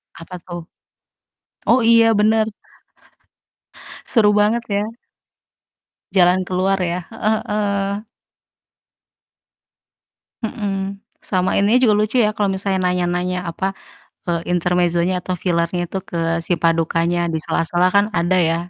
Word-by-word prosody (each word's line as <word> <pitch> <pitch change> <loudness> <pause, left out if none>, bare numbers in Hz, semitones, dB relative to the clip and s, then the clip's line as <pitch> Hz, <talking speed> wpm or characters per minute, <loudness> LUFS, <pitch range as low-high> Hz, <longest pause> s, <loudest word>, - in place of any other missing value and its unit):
Apa 175 +2 -10
tuh? 175 -1 -6 1.0
Oh 255 - +4
iya 230 0 +5
bener. 220 +1 +3 1.6
Seru 210 -4 +3
banget 220 +3 +2
ya. 200 +1 0 1.3
Jalan 180 0 +4
keluar 190 +2 0
ya, 175 0 -1
heeh 220 -1 0
heeh. 200 0 -1 2.4
Mhm, 195 -2 -3 0.2
sama 185 -2 0
ininya 215 +5 +4
juga 220 -5 +4
lucu 215 +3 0
ya, 210 -2 +4
kalo 200 -2 0
misalnya 190 0 -1
nanya-nanya 180 0 -1
apa, 190 +3 -2 0.6
eee, 170 -1 0
intermezzonya 180 0 +1
atau 185 - -2
filernya 175 0 -1
tuh 190 -1 -4
ke 170 - -6 0.3
si 175 - +2
padukannya, 165 +1 +1
di 160 - 0
sela-sela 175 +2 +1
kan 200 +1 +3
ada 175 +2 +2
ya, 165 -1 +2
185 Hz, 115 wpm, -20 LUFS, 175-210 Hz, 2.4 s, iya